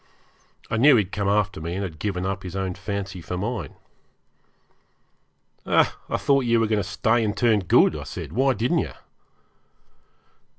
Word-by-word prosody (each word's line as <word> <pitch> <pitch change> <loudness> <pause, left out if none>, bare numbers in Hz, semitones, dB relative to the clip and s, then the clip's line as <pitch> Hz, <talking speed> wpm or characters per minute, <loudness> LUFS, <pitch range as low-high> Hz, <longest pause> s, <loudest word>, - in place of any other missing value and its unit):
I 115 - +1
knew 140 +4 +6
he 110 - +4
had 95 - -14
come 100 -2 -2
after 100 -4 +1
me, 85 +2 -4
and 100 - -2
had 80 -5 -6
given 95 -3 -2
up 95 0 -2
his 90 0 -8
own 95 -1 -2
fancy 100 -2 -5
for 90 +2 -5
mine. 100 -4 -4 1.9
'I - - +5 0.3
thought 140 -2 +2
you 115 -1 +3
were 115 - +2
going 105 -1 +1
to - - -3
stay 110 +5 +1
and 105 -1 -2
turn 115 -4 +3
good,' 90 - +4
I - - -5
said. - - -7
'Why 130 +2 +2
didn't 125 +11 +1
you?' - - -3
100 Hz, 175 wpm, -24 LUFS, 95-115 Hz, 1.9 s, knew